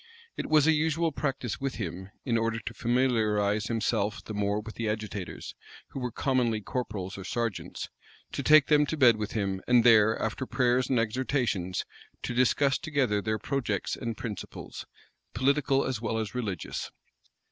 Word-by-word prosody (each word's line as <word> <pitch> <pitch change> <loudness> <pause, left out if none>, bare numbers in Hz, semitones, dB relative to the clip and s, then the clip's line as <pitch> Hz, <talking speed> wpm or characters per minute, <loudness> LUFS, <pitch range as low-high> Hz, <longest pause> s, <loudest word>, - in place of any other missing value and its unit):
It - - -4
was 155 -2 +5
a 160 - +6
usual 160 +1 +1
practice 135 -5 -3
with 135 -1 -2
him, 95 -2 -5 0.2
in 120 -4 +1
order 115 0 +1
to 115 0 -6
familiarize 110 -5 +1
himself 110 -2 -1
the 110 - -6
more 105 0 0
with 110 +1 -8
the 115 -2 -2
agitators, 105 -3 -5 0.4
who - - -6
were 125 -1 -2
commonly 120 -2 +1
corporals 100 -4 -4
or - - -6
sergeants, 115 0 -3 0.4
to - - -3
take 150 +1 +7
them 150 -1 +4
to 160 - -2
bed 120 -6 +6
with 105 -1 -4
him, 100 -3 -1
and 125 -1 +5
there, 110 -2 +6
after 110 +4 -2
prayers 125 0 +2
and 130 - +2
exhortations, 115 -6 -1 0.4
to 125 - -2
discuss 135 +3 +3
together 135 -10 0
their 110 +1 -1
projects 110 -4 -2
and 115 -2 -4
principles, 105 -5 -7 0.5
political 135 +2 +2
as 125 -4 -2
well 115 -1 -1
as 110 -2 -3
religious. 105 -9 -3
115 Hz, 165 wpm, -28 LUFS, 105-130 Hz, 0.5 s, take